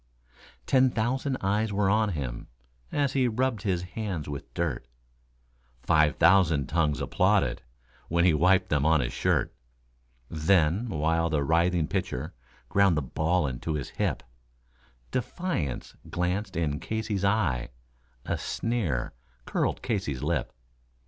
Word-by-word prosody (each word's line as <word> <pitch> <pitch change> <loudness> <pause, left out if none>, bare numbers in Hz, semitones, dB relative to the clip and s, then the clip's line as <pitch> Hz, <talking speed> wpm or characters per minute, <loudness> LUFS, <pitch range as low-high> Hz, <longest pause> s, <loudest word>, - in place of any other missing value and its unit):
Ten 130 -1 +4
thousand 130 +4 -1
eyes 105 +3 0
were 100 0 +1
on 110 +2 +3
him 65 -6 -5 0.4
as 140 -2 0
he 130 -2 +2
rubbed 120 -1 0
his 90 -4 -1
hands 90 -3 -4
with 70 -1 -7
dirt, 80 -8 -2 1.0
Five 75 -1 +3
thousand 80 -4 +4
tongues 75 -3 +1
applauded - - +1 0.5
when 85 +1 +2
he 90 - +5
wiped 90 +4 +3
them 75 -2 +1
on 80 0 +4
his 60 -1 -2
shirt; - - +1 0.7
Then, 85 - +2
while 80 0 +1
the 75 -3 +1
writhing 85 +1 +2
pitcher 70 +8 -3 0.3
ground 100 -5 +3
the 75 - 0
ball 80 +5 0
into 70 +4 -3
his 70 -4 -4
hip, - - -2 0.9
Defiance 130 - -3
glanced 95 +3 -2
in 75 -3 -1
Casey's 110 -1 -3
eye, 90 - +1 0.6
a - - -2
sneer 95 - -2 0.3
curled - - -1
Casey's 85 - -2
lip. - - -1
85 Hz, 130 wpm, -27 LUFS, 75-105 Hz, 1.0 s, he